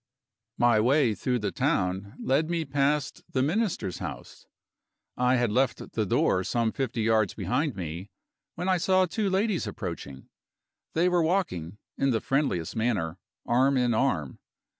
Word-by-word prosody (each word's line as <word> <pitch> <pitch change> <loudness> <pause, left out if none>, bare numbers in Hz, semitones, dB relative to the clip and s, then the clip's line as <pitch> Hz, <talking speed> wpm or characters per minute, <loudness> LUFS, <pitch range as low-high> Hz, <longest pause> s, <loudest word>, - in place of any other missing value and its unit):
My 120 -2 +4
way 125 +1 +3
through 125 +6 -1
the 105 -4 -2
town 95 +3 -1
led 145 +5 +1
me 170 -2 -1
past 140 +1 0
the 130 - +1
Minister's 160 - -1
house. - - -8 0.7
I 125 +1 +3
had 120 -3 +1
left 130 +4 0
the - - -1
door 95 - +2
some 115 +2 0
fifty 120 -4 -2
yards 110 -2 +2
behind 115 - -1
me, 90 +2 -6 0.5
when 180 +2 -3
I 185 -1 +3
saw 185 +2 +3
two 200 +3 -1
ladies 195 0 0
approaching. 70 -1 -6 0.7
They 170 +3 +3
were 180 -1 +3
walking, 160 - -1 0.2
in 135 - +2
the 115 -3 +2
friendliest 135 - -1
manner, 100 -7 -1 0.3
arm 130 +3 +3
in 125 -2 +2
arm. 85 - 0
125 Hz, 150 wpm, -27 LUFS, 105-155 Hz, 0.7 s, My